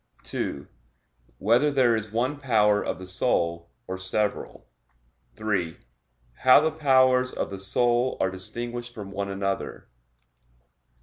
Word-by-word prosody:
(2) 70 - -4 0.7
Whether 120 +8 +3
there 130 -5 +3
is 110 -1 -4
one 125 +6 -1
power 105 -6 +3
of - - -3
the 95 - -9
soul, 85 -3 -1 0.2
or 95 0 -5
several? 100 +2 -2 0.7
(3) 95 -7 -2 0.6
How 130 +1 +7
the 160 +1 +1
powers 130 -4 +3
of - - -4
the 95 - -6
soul 120 +5 +2
are 95 - +1
distinguished 120 +5 -5
from 100 -2 -8
one 100 0 -3
another? 95 0 -4
110 Hz, 125 wpm, -26 LUFS, 95-125 Hz, 0.7 s, How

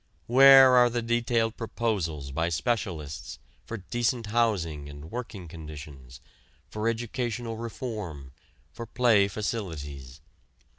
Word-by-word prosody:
Where 135 +1 +8
are 125 -1 +6
the 120 0 -2
detailed 115 -1 0
proposals 95 - -2
by 80 +5 -1
specialists, 80 - -3 0.3
for 115 - -6
decent 120 +4 -1
housing 85 -11 0
and 75 +2 -11
working 115 -7 -6
conditions, 75 -5 -10 0.5
for 110 +1 -1
educational 120 0 -3
reform, 105 - -6 0.4
for 115 -1 -7
play 115 -4 +3
facilities? 75 - -5
110 Hz, 105 wpm, -27 LUFS, 75-120 Hz, 0.5 s, Where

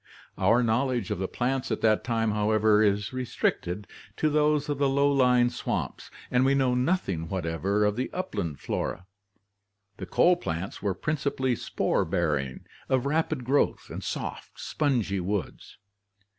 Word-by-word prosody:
Our 115 +6 +3
knowledge 120 0 0
of 100 - -2
the 95 - -1
plants 130 +4 -1
of 110 - -2
the 110 -1 +5
time, 115 0 -1
however, 105 0 +3
is 105 +1 +1
restricted 105 -6 -2 0.3
to 155 - +1
those 150 0 +2
of 145 -2 -2
the 140 -1 +3
low 140 +1 +3
lying 125 -3 +4
swamps 120 - -4 0.2
and 125 0 +3
we 135 +1 +3
know 130 -2 +2
nothing 125 - 0
whatever 95 +3 0
of 105 0 +1
the 130 - -2
upland 100 - -3
flora. 95 - -3 0.9
The - - -7
coal 180 0 +4
plants 85 - -4
were 100 -2 -1
principally 140 - -1
spore - - 0
bearing, 75 -6 -1 0.2
of 130 0 +2
rapid 155 -1 0
growth, 140 +3 +1
and - - -6
soft, - - -5
spongy 120 -10 0
woods. 95 +1 -4
120 Hz, 150 wpm, -27 LUFS, 100-135 Hz, 0.9 s, the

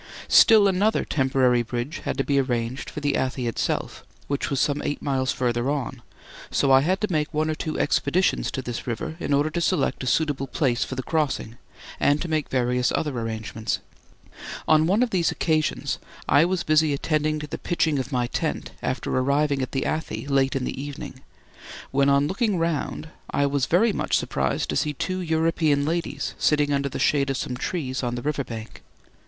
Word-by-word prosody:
Still 215 -3 +7
another 200 +3 +2
temporary 130 -3 +2
bridge 120 +7 -4
had - - -2
to 135 - +1
be 140 0 +2
arranged 120 -1 -2
for 150 - -7
the 145 -1 +1
Athi 130 -1 -1
itself, 115 - -2 0.2
which 140 0 -2
was 140 -3 0
some 145 -1 +1
eight 145 - -2
miles 130 -2 0
further 120 0 0
on, 135 -4 -3 0.5
so 135 - +2
I 135 0 +7
had 185 +6 +1
to 210 -2 -1
make 150 -2 0
one 155 0 0
or - - 0
two 155 0 -4
expeditions 165 +6 +1
to 130 - -4
this 120 0 -5
river 155 +7 -3
in - - -3
order 145 +2 +2
to 170 - -2
select 155 -7 0
a - - -3
suitable 145 -1 +1
place 125 -2 0
for 130 - -5
the 130 - -3
crossing 145 -7 -1 0.4
and 145 +1 +3
to 175 - -3
make 155 -3 -1
various 125 -1 +1
other 150 -4 -1
arrangements. 110 -1 -3 0.9
On 155 0 +5
one 205 +7 +3
of 245 - -1
these 175 -3 +2
occasions 155 -2 0 0.3
I 145 +4 +5
was 180 -1 -1
busy 155 -2 +3
attending 155 +1 0
to 150 - -5
the 150 - -6
pitching 160 -4 0
of 130 +2 -4
my 125 -2 +1
tent - - -3
after - - -2
arriving 140 +2 +1
at 130 - -3
the 135 - -1
Athi 160 -2 -3
late 135 -1 +1
in 135 - -1
the 130 - -4
evening, 140 -2 -7 0.7
when 140 +1 +3
on 140 0 +4
looking 200 +2 0
round 165 -1 -2 0.2
I 140 - +1
was 140 -1 0
very 210 +6 +3
much - - +1
surprised 65 -1 -1
to - - -2
see 150 - 0
two 185 +7 -3
European 160 -3 +1
ladies 170 +2 -2
sitting 145 -1 +2
under 140 0 0
the - - -5
shade 140 -2 +2
of 135 - -1
some 125 - -3
trees 130 -1 -3
on 120 -1 -2
the 120 - -5
river 145 -1 -1
bank. 115 -3 -8
145 Hz, 195 wpm, -24 LUFS, 130-155 Hz, 0.9 s, Still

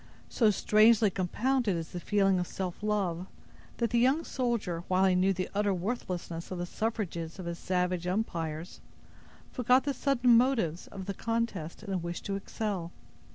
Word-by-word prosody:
So 225 -3 +3
strangely 215 +1 +5
compounded 215 +4 0
is 165 -1 -4
the 175 - -5
feeling 195 0 +2
of 180 - -2
self 185 -1 -5
love, 190 -4 -1 0.5
that 235 -2 0
the 235 - +3
young 265 +7 +3
soldier, 230 - -2
while 185 +1 +3
he 190 - +4
knew 185 +2 +3
the 185 -1 -2
utter 200 -1 +1
worthlessness 180 -4 -4
of 185 - -4
the 175 - -2
suffrages 180 -6 -3
of 185 - -7
his 170 0 -4
savage 180 -1 -1
umpires, 170 -5 -3 0.7
forgot 250 +1 +3
the 285 - -1
sudden 250 -4 +3
motives 230 - +2
of 195 -2 -8
the 200 - -3
contest 225 -7 -3
in 200 -3 -4
a 185 - 0
wish 170 0 -5
to 200 - -2
excel. 195 -3 -3
195 Hz, 170 wpm, -30 LUFS, 175-230 Hz, 0.7 s, strangely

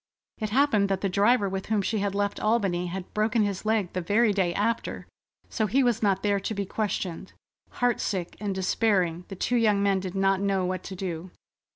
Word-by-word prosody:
It 215 -2 -2
happened 220 -5 +3
that 195 -1 0
the 195 - 0
driver 205 +3 +3
with 190 0 -4
whom 210 -2 +1
she 215 +2 -1
had 200 0 -1
left 205 0 -1
Albany 195 -5 +1
had 180 +1 -6
broken 215 +1 +2
his 200 0 -3
leg 215 -5 +1
the 185 - -1
very 210 +5 +3
day 190 -3 +1
after, 220 +6 -2 0.4
so 220 - -1
he 265 +7 +2
was 240 -3 +1
not 195 -3 +1
there 205 -1 +2
to 215 +3 -4
be 200 0 -2
questioned. 190 -4 -3 0.4
Heartsick 210 -7 -1
and 200 -2 -2
despairing, 185 -3 +1
the 195 - -7
two 245 +6 0
young 210 -3 +3
men 200 -1 +2
did 185 0 -6
not 195 0 +2
know 195 -2 +1
what 185 0 -2
to 190 - -6
do. 180 -1 -5
200 Hz, 205 wpm, -26 LUFS, 190-215 Hz, 0.4 s, happened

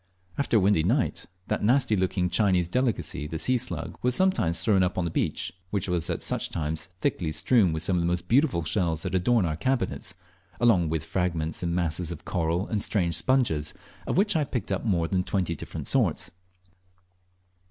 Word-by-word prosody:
After 140 -5 +1
a - - +5
windy 100 -3 +3
night, 120 - 0 0.2
that - - -1
nasty 120 0 +3
looking 90 -1 0
Chinese 90 -1 +2
delicacy 115 - -1
the 80 - -4
sea 125 +9 +2
slug 125 - -4
was 125 0 +1
sometimes 185 - +2
thrown 100 -4 +3
up 90 0 0
on 90 - 0
the 85 - -2
beach, - - -2 0.2
which 100 -1 -1
was 90 -1 0
at 85 - -3
such - - -1
times 80 0 -3
thickly 85 -3 -1
strewn 105 +1 +3
with 80 0 -2
some 90 +1 +1
of - - +1
the 85 - 0
most 85 0 -1
beautiful 125 - +2
shells 80 -2 0
that - - -4
adorn 95 +3 +2
our 80 -2 -1
cabinets, 115 -4 -2 0.4
along 110 -9 +3
with 80 -1 -2
fragments 80 -2 -2
and 85 -1 -1
masses 85 0 -1
of 85 -1 -8
coral 85 +1 -1
and 105 -2 -2
strange 90 -6 0
sponges, 85 - +1 0.3
of - - -1
which 205 0 +3
I 155 - +3
picked 125 -6 -4
up 95 - -1
more 90 -7 +1
than 90 +1 0
twenty 90 -3 -1
different - - -7
sorts. - - +1
90 Hz, 195 wpm, -26 LUFS, 85-115 Hz, 0.4 s, a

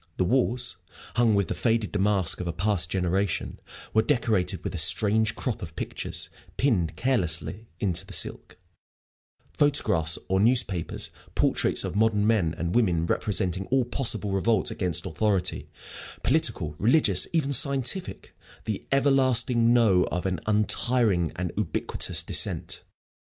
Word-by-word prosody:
The - - +1
walls, 120 0 -1 0.4
hung 115 -2 +3
with 100 -3 +1
the - - -2
faded 115 -5 -1
damask 100 -3 +1
of 90 - -4
a - - -1
past 95 -2 0
generation, 95 +1 -2 0.3
were 110 - +4
decorated 110 -7 0
with - - -4
a - - -2
strange 110 +1 +3
crop 125 -5 -4
of 80 -2 -8
pictures - - -5 0.3
pinned 95 - 0
carelessly 100 -2 0
into 95 -5 -1
the - - -9
silk - - -3 1.0
photographs 105 - +2
or 95 0 +1
newspaper 110 -6 +1 0.4
portraits - - +2
of - - -5
modern 105 -1 +2
men 100 -8 +1
and 85 +2 -3
women 90 -9 +1
representing 95 0 -1
all 130 -1 +1
possible 115 -4 -1
revolt 95 +2 +1
against 90 -5 -1
authority, 100 +2 -1 0.5
political, 75 0 +1
religious, 125 +9 +3
even 145 -4 0
scientific, 140 +7 0 0.3
the 110 -3 -5
Everlasting 130 -4 +3
No 110 -7 +4
of 90 - -4
an 90 -3 -1
untiring 105 -3 +2
and 90 -1 -4
ubiquitous - - -1
dissent. - - -1
105 Hz, 135 wpm, -26 LUFS, 90-120 Hz, 1.0 s, were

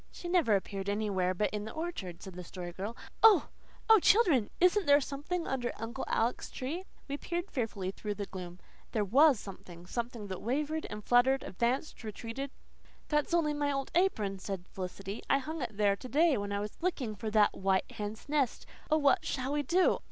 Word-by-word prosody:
"She 350 - -8
never 345 - +3
appeared 195 0 -3
anywhere 200 -3 0
but 210 +3 0
in 210 0 -3
the 220 - -7
orchard," 310 - -5
said 190 - -8
the 180 +1 -7
Story 175 0 -7
Girl. 200 +6 -5 0.2
"Oh, 425 -8 +7 0.4
oh, 445 -1 +8
children, 340 - +4
isn't 365 0 +4
there 285 0 +7
something 295 +5 -3
under 250 -2 -1
Uncle 235 +4 -4
Alec's 230 +2 0
tree?" 320 +9 -4 0.2
We 280 0 -3
peered 345 +4 -4
fearfully 210 -7 -2
through 210 +1 -4
the 200 - -4
gloom. 180 -2 -8 0.3
There 215 -2 +1
WAS 270 +4 +5
something 175 -4 -10
something 235 +1 -4
that 190 -2 -6
wavered 300 +6 -1
and 210 0 -7
fluttered 260 +2 +4
advanced 240 +8 -1
retreated 230 +5 -5 0.6
"That's 300 0 +1
only 325 -3 +2
my 290 -1 0
old 275 -1 -2
apron," 215 - +1
said 190 -2 -5
Felicity. 195 +2 -5
"I 275 - +5
hung 310 +3 -5
it 230 -5 -4
there 205 -1 +3
to 255 +5 -9
day 315 +2 +4
when 205 -2 -3
I 200 0 -1
was 210 +8 -7
looking 295 -11 -1
for 215 +2 -4
the 215 -1 +4
white 190 0 0
hen's 210 +3 -6
nest. 285 -4 0 0.2
Oh, 310 - +4
what 285 -3 +3
shall 260 +1 -2
we 295 - +1
do? 350 +6 +3
235 Hz, 195 wpm, -31 LUFS, 200-295 Hz, 0.6 s, oh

